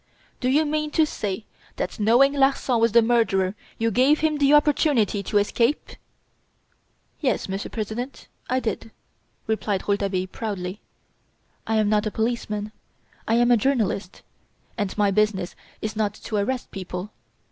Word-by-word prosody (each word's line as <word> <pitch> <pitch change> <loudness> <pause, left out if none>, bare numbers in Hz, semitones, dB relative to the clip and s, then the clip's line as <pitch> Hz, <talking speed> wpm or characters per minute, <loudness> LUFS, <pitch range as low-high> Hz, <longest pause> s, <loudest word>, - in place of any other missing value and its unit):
"Do 255 - 0
you 300 +4 +3
mean 305 0 -1
to 320 - +6
say 210 -6 -4 0.3
that - - -4
knowing 240 +6 +5
Larsan 270 -3 +2
was 230 0 +3
the 235 -1 +6
murderer 220 -5 +2 0.2
you 230 0 +1
gave 265 +7 +3
him 310 -1 +1
the 280 0 +4
opportunity 295 - +3
to 205 +2 0
escape?" 230 +7 +1 1.3
"Yes, 270 - 0
Monsieur 195 +1 -4
President, 230 +4 -5 0.2
I 255 +1 +2
did," 225 0 -3 0.6
replied 215 -3 -1
Rouletabille, 200 -2 0
proudly. 190 -1 -5 0.9
"I 220 - +1
am 215 -1 +3
not 210 0 +2
a 215 - -6
policeman, 215 -2 -2 0.6
I 225 - +3
am 240 +1 +4
a 240 - +6
journalist; 215 -6 -1 0.5
and 205 -3 -3
my 205 -1 +3
business 195 -3 0 0.3
is 215 0 -3
not 210 -1 -1
to 215 - -4
arrest 245 +5 -2
people. 185 +1 -6
220 Hz, 145 wpm, -24 LUFS, 205-255 Hz, 1.3 s, to